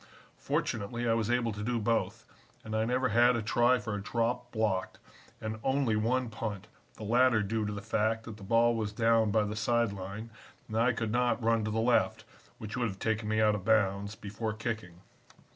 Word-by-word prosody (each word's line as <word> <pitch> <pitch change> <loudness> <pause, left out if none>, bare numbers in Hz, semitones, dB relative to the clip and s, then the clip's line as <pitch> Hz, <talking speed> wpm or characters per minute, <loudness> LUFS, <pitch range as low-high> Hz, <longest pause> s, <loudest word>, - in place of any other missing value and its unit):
Fortunately 120 +3 -2
I 115 - +3
was 115 -1 0
able 120 -1 +1
to 105 0 -6
do 120 +3 -1
both, 115 +1 -1 0.4
and 110 0 -5
I 110 0 +1
never 125 +2 +1
had 120 +2 +5
a 115 - -2
try 120 +3 +3
for 110 -3 -5
a 105 - -3
drop 120 +3 -1
blocked, 105 -4 -1 0.4
and 110 0 -5
only 135 -4 +1
one 120 +4 +1
punt, 105 -2 -5 0.3
the - - -9
latter 120 0 +3
due 105 +1 -1
to - - -2
the 105 -1 -6
fact 110 0 0
that 110 -2 -9
the 100 - -12
ball 115 +3 +3
was 105 -2 -2
down 115 0 +3
by 110 +1 +2
the 105 0 -3
side 115 0 +1
line, 100 +4 -7 0.4
and 110 - -6
I 115 +3 +3
could 115 -2 -3
not 120 0 +1
run 115 -1 +2
to - - -1
the 110 +1 -1
left 120 +1 +2 0.3
(which 110 0 -7
would 120 -2 0
have 95 -3 -6
taken 110 0 -1
me 110 0 +2
out 105 -1 +4
of 105 -3 -3
bounds) 100 -1 +1
before 110 +1 -4
kicking. 110 -6 -5
110 Hz, 210 wpm, -30 LUFS, 105-120 Hz, 0.4 s, had